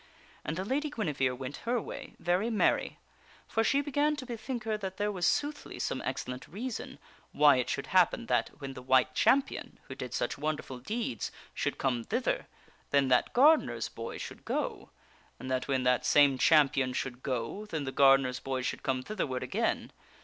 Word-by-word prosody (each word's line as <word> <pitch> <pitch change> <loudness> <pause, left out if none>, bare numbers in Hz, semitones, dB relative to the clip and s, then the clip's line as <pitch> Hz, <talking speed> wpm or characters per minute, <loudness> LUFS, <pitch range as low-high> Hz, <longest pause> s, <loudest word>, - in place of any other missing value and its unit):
And 155 - -3
the 185 - -2
Lady 290 +7 -1
Guinevere 145 - -1
went 130 +2 -6
her 240 +1 -1
way, - - -8
very 180 +6 +1
merry. 220 -3 +1 0.5
For 225 - +1
she 280 +5 +3
began 290 +1 +1
to 280 -3 -7
be 240 -2 -5
think 240 +1 -5
her 220 -1 -1
that 190 -3 -5
there 210 0 0
was 180 -3 0
soothly 295 0 -1
some - - -2
excellent 125 0 -4
reason 230 +6 -5 0.4
why 145 -3 +6
it 125 - -1
should - - -2
hap - - +5
pen - - -7
that - - +1
when 135 -1 -6
the 130 - -9
White 130 0 +3
Champion, 270 - +1
who - - -9
did - - -6
such - - -2
wonderful 150 -4 -3
deeds, 170 - -3 0.2
should - - -2
come 125 -3 0
thither, 255 - -1 0.4
then 140 -2 +3
that 125 -1 +3
gardener's 250 - +4
boy 115 0 -6
should - - -8
go; - - -3 0.5
and 130 - -6
that 130 0 -1
when 135 -2 +1
that 125 0 +3
same 140 -3 +5
Champion 135 -4 +4
should 125 0 -4
go, 130 - -3
then 160 -7 -3
the 135 - -3
gardener's 135 -2 +4
boy 130 -1 -3
should - - -3
come 130 -1 -1
thither 215 +3 -2
ward 130 -1 -3
again. - - -1
145 Hz, 190 wpm, -30 LUFS, -, 0.5 s, why